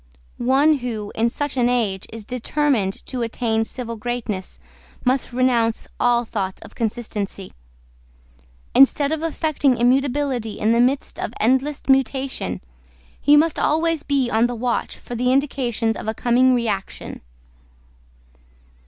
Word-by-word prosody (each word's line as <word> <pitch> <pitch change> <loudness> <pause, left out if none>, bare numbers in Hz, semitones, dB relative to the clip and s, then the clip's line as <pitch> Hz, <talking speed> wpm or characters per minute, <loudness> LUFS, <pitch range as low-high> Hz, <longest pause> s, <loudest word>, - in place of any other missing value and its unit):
One 275 +4 +3
who, 220 -4 -4
in 230 +1 +1
such 285 +2 -3
an 245 -1 +3
age, 215 -6 0
is 220 -1 -9
determined 250 -4 -1
to 255 -2 -4
attain 230 -1 0
civil 230 -1 -6
greatness 220 -4 -4 0.5
must 260 +1 +1
renounce 240 -2 +1
all 240 0 +3
thoughts 195 -4 -3
of - - -13
consistency. 210 -4 -4 1.2
Instead 280 +2 +5
of 315 -1 -1
affecting 310 -5 +1
immutability 255 -2 +1
in 215 - +1
the 235 +1 +4
midst 265 +3 0
of 225 - -4
endless 265 +5 +1
mutation, 265 - 0 0.6
he 295 +1 +6
must 320 +1 +3
be - - -1
always 320 0 +1 0.3
on 225 +2 +3
the 245 - -4
watch 240 +1 -2
for - - -9
the 250 +1 +1
indications 250 -5 0
of - - -7
a 220 - -1
coming 250 +2 +3
reaction. 220 -5 -3
245 Hz, 135 wpm, -22 LUFS, 225-270 Hz, 1.2 s, he